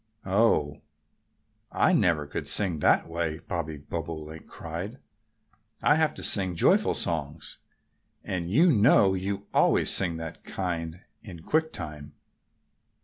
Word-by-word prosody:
"Oh! 95 -7 +1 0.9
I - - +2
never 80 -4 +2
could 75 - -5
sing 90 -7 +1
that - - +3
way!" 80 -2 -3
Bobby 80 -3 -5
Bobolink 80 +1 -7
cried. 85 +9 -7 0.9
"I 145 - +5
have 160 -1 +1
to - - -7
sing 95 -4 0
joyful - - +3
songs. 80 -1 -4 0.6
And 85 -2 -3
you 165 - +4
know 100 -4 +5
you 100 +2 -3
always - - +3
sing 85 -3 +2
that 80 -1 -8
kind 85 -2 -4 0.2
in 90 -7 -10
quick 160 - 0
time." 75 -1 -8
85 Hz, 125 wpm, -27 LUFS, 80-100 Hz, 0.9 s, I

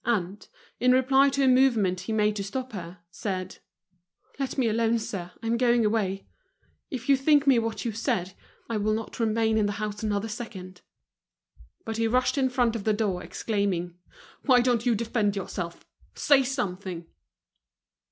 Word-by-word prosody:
And, 205 -4 -2 0.3
in 250 0 +4
reply 265 +2 +4
to 275 0 0
a - - +4
movement 235 -8 +3
he 185 +5 -5
made 210 -1 +2
to 200 - -2
stop 255 +6 -5
her, 180 -3 -7
said: 185 -1 -4 0.8
"Let 270 0 -3
me 255 -3 +2
alone, 225 +1 +2
sir, 195 -5 -5
I'm 230 +1 0
going 240 -2 +3
away. 200 -3 0 0.6
If 255 -3 -6
you 280 - +6
think 285 +1 +3
me 265 -4 +5
what 225 +1 -3
you 230 - 0
say. 190 -4 -2 0.3
I 230 - -2
will 215 +1 +1
not 225 +2 -6
remain 220 -1 +2
in 210 - +2
the 205 - -2
house 210 0 -4
another 210 0 -1
second." 195 -5 -8 1.0
But 225 0 -4
be 225 0 +1
rushed 250 +3 +2
in 260 -1 +2
front 245 -2 +1
of 220 - -4
the 215 - +2
door, 205 -4 -1
exclaiming: 195 -5 -2 0.5
"Why 255 -3 +6
don't 240 -1 +1
you 235 - +4
defend 215 -2 0
yourself'? 180 -3 -5 0.3
Say 285 -2 +4
something!" 190 -9 -3
225 Hz, 170 wpm, -27 LUFS, 200-245 Hz, 1.0 s, you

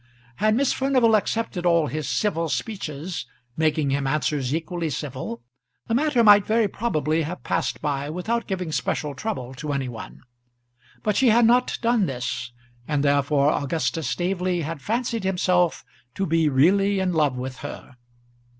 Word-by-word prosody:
Had 215 +1 +2
Miss 275 +2 +2
Furnival 260 -4 +3
accepted 215 -3 -1
all 170 -2 +3
his 150 +2 -4
civil 165 -6 0
speeches, 155 - -4 0.3
making 155 -3 +1
him 140 0 0
answers 140 -2 0
equally 165 +1 -2
civil, 130 -4 -5 0.4
the 225 - -2
matter 265 -1 +3
might 205 -2 +8
very 220 +1 +2
probably 160 -8 -1
have 165 +4 -5
passed - - -1
by 145 -1 -1
without 220 +8 -2
giving 180 -4 -3
special 150 -1 -2
trouble 135 - -4
to 145 +3 -5
any 135 -2 -1
one. 115 -3 -9 0.8
But 210 -1 +1
she 265 - +4
had 235 +1 +5
not 245 +2 +3
done 230 -4 +3
this, 125 -2 -4 0.4
and 145 -2 0
therefore 140 0 +3
Augustus 160 +2 -1
Staveley 180 -1 -1
had 155 -1 -5
fancied 230 - -2
himself 180 -2 +1 0.3
to 195 - -1
be 165 -2 +2
really 195 +9 +3
in 185 -1 0
love 150 -5 +1
with 130 0 -5
her. - - -9
165 Hz, 155 wpm, -24 LUFS, 145-210 Hz, 0.8 s, might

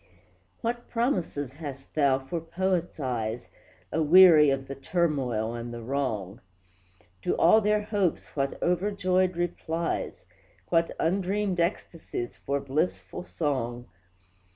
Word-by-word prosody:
What 240 +1 -3
promises 180 - -1
hast 140 -3 -8
thou 140 -3 +3
for 135 +5 -5
Poets' 175 +1 -1
eyes, 120 -4 -3 0.4
Aweary 160 -1 +7
of 135 -1 -1
the 140 - -5
turmoil 135 -8 -1
and 120 0 -5
the 120 -1 -7
wrong! 115 -6 -3 0.8
To - - -1
all 195 +7 +6
their 210 0 +2
hopes 205 -5 0
what 140 -1 -1
overjoyed 185 0 +1
replies! 170 -1 -2 0.4
What 165 -1 +3
undreamed 190 +2 0
ecstasies 170 - -3
for 140 +1 -2
blissful 155 +5 -2
song! 125 -6 -2
160 Hz, 110 wpm, -27 LUFS, 135-185 Hz, 0.8 s, Aweary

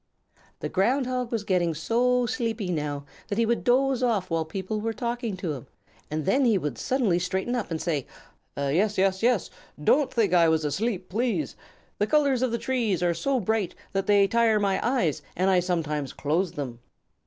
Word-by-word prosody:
The - - -2
Ground 250 +8 +1
Hog 250 -1 -2
was 225 -3 -1
getting 175 -5 +1
so 245 +8 +2
sleepy 225 -5 -2
now 145 -3 -3 0.2
that 205 - -3
he 230 - +3
would 235 +1 0
doze 260 +1 +2
off 210 -8 0
while 165 -1 0
people 195 +6 -4
were 225 +1 -1
talking 235 -3 -3
to 175 -4 -3
him, 130 -5 -8 0.4
and 155 -1 -3
then 275 +1 +3
he 230 -5 +4
would 150 -9 -3
suddenly 235 -10 +1
straighten 190 +6 -2
up 245 -4 -2
and 165 -2 -2
say: 155 -7 -2 0.5
"Yes, 165 +10 +1
yes, 190 0 +2
yes! 235 -4 +2 0.3
Don't 280 - +3
think 225 -4 +1
that 175 -1 +5
I 165 - +5
was 160 -1 +1
asleep, 190 - -1
please. 240 - -1 0.4
The 210 - +2
colors 280 -3 +3
of 255 -2 +1
the 235 - 0
trees 230 -9 0
are 175 -1 +2
so 270 +8 0
bright 215 -3 -1 0.2
that 195 0 -1
they 200 -1 +5
tire 225 0 +3
my 200 -2 +1
eyes 235 - +1
and 190 +2 +2
I 185 - +4
sometimes 155 -6 -2
close 165 +5 0
them." 125 -5 -5
200 Hz, 195 wpm, -26 LUFS, 170-240 Hz, 0.5 s, that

